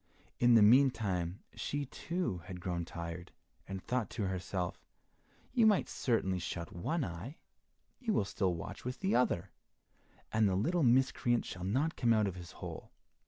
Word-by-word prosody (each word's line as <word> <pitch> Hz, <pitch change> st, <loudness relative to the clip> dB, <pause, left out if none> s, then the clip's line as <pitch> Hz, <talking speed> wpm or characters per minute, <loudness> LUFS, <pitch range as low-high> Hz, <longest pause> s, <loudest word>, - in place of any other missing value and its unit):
In 120 Hz, -1 st, +6 dB
the 110 Hz, -, +8 dB
meantime 105 Hz, -7 st, +3 dB
she, 145 Hz, 0 st, -3 dB
too, 165 Hz, -, -3 dB
had 90 Hz, -1 st, -7 dB
grown 90 Hz, -1 st, -2 dB
tired 85 Hz, +1 st, -6 dB, 0.4 s
and 95 Hz, -1 st, -4 dB
thought 125 Hz, -2 st, -1 dB
to 110 Hz, -4 st, -2 dB
herself, 90 Hz, -1 st, -3 dB, 0.7 s
"You 235 Hz, -4 st, +5 dB
might 210 Hz, -3 st, +4 dB
certainly 95 Hz, -7 st, 0 dB
shut 85 Hz, -1 st, -5 dB
one 155 Hz, -, -1 dB
eye, 90 Hz, -, -7 dB, 0.6 s
you 240 Hz, -4 st, -1 dB
will 105 Hz, -, +2 dB
still 95 Hz, -3 st, 0 dB
watch 85 Hz, -, -7 dB
with 125 Hz, +1 st, -5 dB
the 190 Hz, +1 st, +1 dB
other, 120 Hz, -8 st, +1 dB, 0.8 s
and 110 Hz, -2 st, +4 dB
the 95 Hz, -, +1 dB
little 165 Hz, -, +1 dB
miscreant 125 Hz, -2 st, +3 dB
shall 90 Hz, 0 st, -6 dB
not 135 Hz, +11 st, +1 dB
come 115 Hz, -1 st, +3 dB
out 110 Hz, -1 st, +3 dB
of 95 Hz, -, -2 dB
his 85 Hz, -1 st, -9 dB
hole." -, -, -8 dB
105 Hz, 165 wpm, -33 LUFS, 90-130 Hz, 0.8 s, the